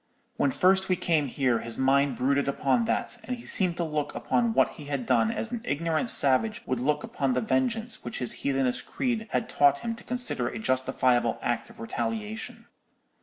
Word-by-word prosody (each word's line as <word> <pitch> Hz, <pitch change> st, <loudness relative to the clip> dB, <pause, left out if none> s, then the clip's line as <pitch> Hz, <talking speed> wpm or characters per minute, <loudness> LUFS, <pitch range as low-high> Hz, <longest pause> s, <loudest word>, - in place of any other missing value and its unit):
When 140 Hz, -, +2 dB
first 190 Hz, +6 st, +3 dB
we 185 Hz, -, +3 dB
came 165 Hz, -5 st, +1 dB
here, 125 Hz, -3 st, +1 dB
his 115 Hz, 0 st, -4 dB
mind 135 Hz, 0 st, +2 dB
brooded 140 Hz, +2 st, +1 dB
upon 230 Hz, -, +1 dB
that, 240 Hz, +1 st, -2 dB
and 250 Hz, +3 st, -4 dB
he 235 Hz, -, -12 dB
seemed 180 Hz, -3 st, -1 dB
to 175 Hz, -, 0 dB
look 150 Hz, -2 st, -3 dB
upon 235 Hz, -2 st, 0 dB
what -, -, +4 dB
he 150 Hz, -, -11 dB
had 140 Hz, -3 st, -3 dB
done 115 Hz, -1 st, +3 dB
as 230 Hz, -, -3 dB
an 240 Hz, -2 st, -4 dB
ignorant 165 Hz, -, -1 dB
savage 145 Hz, -, +4 dB
would 130 Hz, -1 st, -1 dB
look 150 Hz, +3 st, 0 dB
upon 135 Hz, -2 st, -1 dB
the -, -, +1 dB
vengeance 230 Hz, -1 st, -1 dB
which -, -, -5 dB
his 125 Hz, -, -1 dB
heathenish 135 Hz, -2 st, 0 dB
creed 230 Hz, -4 st, -2 dB
had 225 Hz, -, -1 dB
taught 140 Hz, -1 st, +3 dB
him 230 Hz, -, -2 dB
to 235 Hz, -, -12 dB
consider 245 Hz, -, -1 dB
a -, -, -5 dB
justifiable 125 Hz, 0 st, +1 dB
act 120 Hz, -, -2 dB
of 230 Hz, -1 st, -16 dB
retaliation. 225 Hz, -1 st, -4 dB
150 Hz, 195 wpm, -27 LUFS, -, -, what